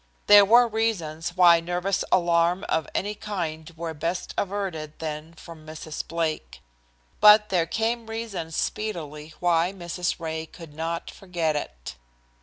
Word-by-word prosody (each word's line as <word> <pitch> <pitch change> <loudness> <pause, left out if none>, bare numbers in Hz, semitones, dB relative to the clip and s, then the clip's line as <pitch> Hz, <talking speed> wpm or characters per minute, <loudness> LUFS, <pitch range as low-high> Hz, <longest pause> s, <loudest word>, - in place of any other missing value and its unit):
There 205 0 +9
were 240 +4 +6
reasons 180 -7 -2
why 175 -2 +7
nervous 180 +3 -1
alarm 175 +1 +3
of 160 - 0
any 205 +2 -1
kind 170 -6 -5
were 165 0 -4
best 170 +4 -3
averted 185 -6 -3
then 155 0 -6
from 165 -1 -12
Mrs. 155 0 -7
Blake. 165 -2 -3 0.6
But 210 0 +7
there 175 -3 +1
came 225 +3 -1
reason 225 -7 -5
speedily 155 -5 -4
why 175 0 +2
Mrs. 175 -2 -3
Ray 160 -1 -4
could 165 -2 -12
not 165 +2 -4
forget 170 -5 -2
it. - - -6
170 Hz, 135 wpm, -25 LUFS, 160-195 Hz, 0.6 s, There